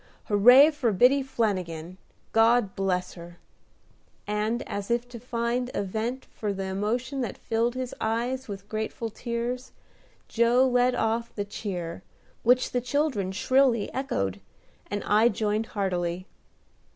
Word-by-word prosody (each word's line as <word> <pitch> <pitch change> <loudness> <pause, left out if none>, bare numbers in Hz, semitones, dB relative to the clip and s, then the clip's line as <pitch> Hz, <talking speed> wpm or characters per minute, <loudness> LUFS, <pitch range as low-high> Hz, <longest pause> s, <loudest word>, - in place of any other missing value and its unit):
Hooray 245 +9 +7
for 285 -7 0
Biddy 250 +8 +4
Flanagin! 185 -9 -2 0.3
God 225 -2 +3
bless 185 -2 -1
her!" 170 0 -11 0.9
and, 210 +3 -1
as 200 +1 -4
if 240 +1 0
to 240 -1 -9
find 240 +1 -2
a - - 0
vent 225 +6 -3
for 210 -2 -3
the 195 0 -4
emotion 225 +8 -2
that 235 -6 -4
filled 230 +1 -1
his 255 -1 -4
eyes 240 +4 -1
with 200 -1 -7
grateful 220 +1 -4
tears, 240 +2 -4 0.5
Joe 240 +3 +3
led 250 0 +3
off 230 +1 -1
the 205 - -2
cheer, 180 -5 -5 0.4
which 250 +2 +3
the 245 - 0
children 250 -7 0
shrilly 240 +2 +2
echoed, 100 - -2 0.5
and 205 -1 -3
I 215 +3 +4
joined 215 +1 -1
heartily. 180 -3 -2
225 Hz, 135 wpm, -27 LUFS, 200-245 Hz, 0.9 s, Hooray